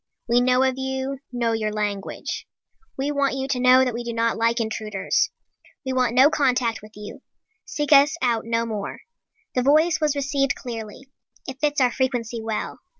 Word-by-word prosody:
We 240 +1 +3
know 250 +1 +3
of 260 0 0
you, 265 0 -3
know 240 -2 0
your 220 -1 -1
language. 205 -2 -4 0.5
We 275 +2 -1
want 280 -2 0
you 265 0 -3
to 255 - 0
know 255 +1 +6
that 250 - -1
we 240 +1 -4
do 235 0 -4
not 230 0 +1
like 230 +1 +1
intruders. 215 -3 -1 0.6
We 260 - -2
want 250 -2 +1
no 270 +4 +6
contact 250 -6 +1
with 215 0 -14
you. 210 +6 -9 0.4
Seek 295 0 -3
us 285 +3 +6
out 235 -5 +1
no 230 0 -1
more. 210 -3 -5 0.5
The 250 - +1
voice 310 +5 +3
was 300 -2 +1
received 275 -1 0
clearly. 235 +2 -8 0.4
It 265 0 -7
fits 295 -1 +1
our 250 -2 +3
frequency 240 -3 -2
well. 220 -1 -4
250 Hz, 180 wpm, -23 LUFS, 230-270 Hz, 0.6 s, know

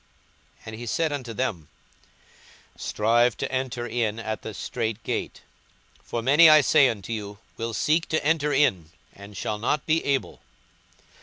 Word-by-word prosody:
And 110 - -7
he 120 +2 -8
said 160 +6 0
unto 130 -5 -5
them, 105 - -3 1.1
42:013:024 - - -16
Strive 115 +3 +2
to - - -4
enter 130 -2 -3
in 115 -2 -1
at 110 -1 -4
the 110 - -7
strait 115 0 -4
gate: - - -4 0.6
for 115 - -4
many, 150 +6 +7
I 155 -1 +8
say 135 0 +5
unto 105 0 -5
you, 105 -2 -6 0.2
will 115 -1 -4
seek 160 - +1
to 155 -2 -1
enter 150 -1 +1
in, 95 - +2 0.2
and 100 0 -12
shall 105 +3 -3
not 135 +6 -1
be 160 +1 +1
able. 140 -2 -2
120 Hz, 160 wpm, -25 LUFS, 110-140 Hz, 1.1 s, I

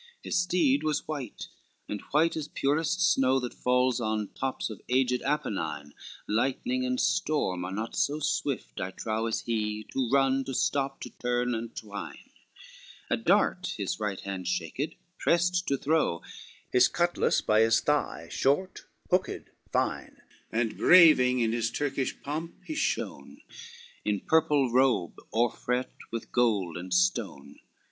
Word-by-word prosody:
LXXXII 475 0 -24
His - - -1
steed 160 -6 +2
was 155 -1 -1
white, 140 -7 -5 0.4
and 105 - -4
white 160 +3 +3
as 155 -2 -3
purest 155 +6 0
snow 135 -2 +3
That 125 -1 -5
falls 125 -1 +1
on 110 -2 -1
tops 130 -3 -3
of 110 - -9
aged 125 -1 +2
Apennine, 80 - -2 0.3
Lightning 135 - 0
and 255 0 -1
storm 145 - 0
are 90 - -4
not 110 +4 -4
so 145 +1 +1
swift - - -2
I 90 - -2
trow 110 +3 -2
As 110 - -1
he, 110 -2 -2
to 130 -3 0
run, 135 0 +3
to 135 - -4
stop, 135 0 0
to - - -7
turn 125 0 -1
and 115 0 -5
twine; 100 -2 -8 0.8
A - - +4
dart - - +1
his - - -3
right 105 -3 -2
hand 95 -2 -5
shaked, 130 - -2 0.2
prest 180 +1 +2
to 140 - +1
throw; 150 - +1 0.5
His 125 0 +6
cutlass 175 0 +1
by 110 0 +3
his 115 0 +4
thigh, 130 - -1
short, 145 +8 0 0.3
hooked, - - 0 0.2
fine, - - -1 0.3
And 115 -1 -1
braving 130 -8 +7
in 115 -1 +2
his 115 0 0
Turkish 135 0 -2
pomp 155 +4 -4
he 315 - -4
shone, 315 - -3 0.6
In 105 -2 0
purple 150 -5 +2
robe, 125 - +2
o'erfret 120 +2 0 0.2
with 115 -1 -5
gold 105 -9 +1
and 90 +1 -7
stone. 90 -6 0
125 Hz, 150 wpm, -28 LUFS, 110-150 Hz, 0.8 s, braving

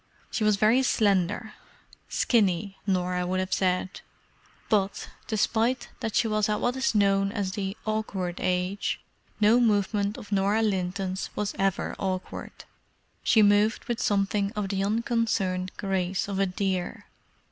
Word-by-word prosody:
She 220 - -1
was 215 -1 +4
very 215 +6 +4
slender—"skinny," 205 -1 0
Norah 180 -1 0
would 185 +1 0
have 185 0 -2
said—but, 190 +2 -2 0.2
despite 230 +3 0
that 225 -3 -3
she 230 - +3
was 215 0 +1
at 210 - +1
what 245 +1 0
is 260 -3 0
known 195 -1 +3
as 200 -3 -2
"the 195 +1 -4
awkward 205 -5 -2
age," 185 +2 -1 0.4
no 215 +3 +5
movement 205 -2 +1
of 205 - -11
Norah 200 +3 +2
Linton's 190 -1 -1
was 210 -2 -2
ever 195 -1 0
awkward. 185 -1 -4 0.6
She 220 - +4
moved 205 +2 +3
with 240 -1 -2
something 200 0 +1
of 210 -3 -3
the 195 -1 0
unconcerned 205 -4 0
grace 190 -1 -1
of 195 -1 -3
a 195 - +3
deer. 185 -1 -2
200 Hz, 135 wpm, -27 LUFS, 190-215 Hz, 0.6 s, no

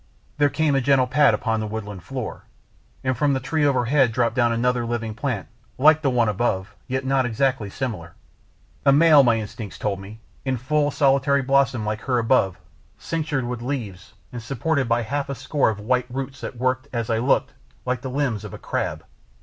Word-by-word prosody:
There 145 -1 +4
came 145 +1 +1
a 135 - +2
gentle 130 0 +3
pat 145 +3 +4
upon 110 -2 -1
the 110 - -3
woodland 105 -3 -6
floor, 125 0 -6 0.6
and 130 -1 0
from 140 +3 +2
a - - 0
tree 150 +4 -1
overhead 135 -2 +3
dropped 120 0 0
down 120 -2 +3
another 120 +1 +1
living 115 -2 -3
plant 115 -4 -3 0.3
like 150 +3 +6
to - - -22
the 140 - +2
one 120 -3 +2
above 105 -2 -1
yet 130 +1 -2
not 135 0 +2
exactly 125 -2 0
similar, 100 -9 -5 0.7
a 140 - +5
male, 150 0 +7
my 120 -3 +3
instincts 105 -1 -7
told 100 -2 -2
me, 100 +3 -10 0.2
in 130 -1 -1
full 145 +4 +1
solitary 140 -1 +2
blossom 135 -4 +2
like 105 0 -2
her 125 -2 0
above, 115 -6 +2 0.4
cinctured 155 -5 -2
with 120 -1 -4
leaves, 115 -9 -5 0.2
and 120 - -5
supported 135 +3 -1
by 115 0 +2
half 140 +5 -3
a 140 - -3
score 145 0 +1
of 110 - -3
thick 105 - -10
white 125 +1 +1
roots 135 +1 -5
that 125 - -6
worked, 130 +2 0
as 120 -2 -2
I 110 - +1
looked, 130 +4 +1 0.3
like 125 0 -1
the 130 - -5
limbs 125 -6 -1
of - - -7
a - - -8
crab. - - -3
125 Hz, 200 wpm, -23 LUFS, 115-140 Hz, 0.7 s, male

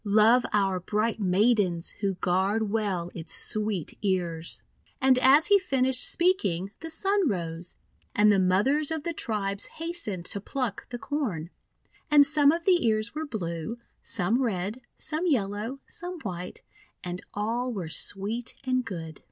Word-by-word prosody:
Love 220 +4 +5
our 195 -3 +2
bright 215 +5 -1
Maidens, 190 -3 +2
Who 195 -2 0
guard 195 +4 0
well 195 -6 -1
its 165 -1 -5
sweet 210 -6 -1
ears!" 175 -4 -2 0.4
And 260 -1 +4
as 270 +5 +6
he 405 -1 +6
finished 265 -7 +1
speaking, 200 - +1
the 325 - -6
Sun 390 +1 +2
rose, 170 -3 -2 0.4
and 210 0 +6
the 200 - +4
mothers 210 +12 +2
of 320 -2 -3
the 340 - -2
tribes 200 -7 -1
hastened 325 - -2
to 200 - -3
pluck 250 -2 -3
the 245 - -5
Corn. 215 - -3 0.6
And 295 -1 +7
some 290 0 +5
of 335 +1 -3
the 360 -3 +4
ears 215 +1 0
were 310 +1 -4
blue, 180 - -4 0.2
some 220 +6 0
red, 210 0 -2 0.2
some 320 +4 -2
yellow, 225 - -1
some 355 0 -7
white, 180 -3 -6 0.4
and 180 0 -5
all 230 +5 -1
were 190 -8 -4
sweet 205 +8 -2
and 255 -1 +1
good. 165 -8 -7
215 Hz, 150 wpm, -27 LUFS, 185-270 Hz, 0.6 s, And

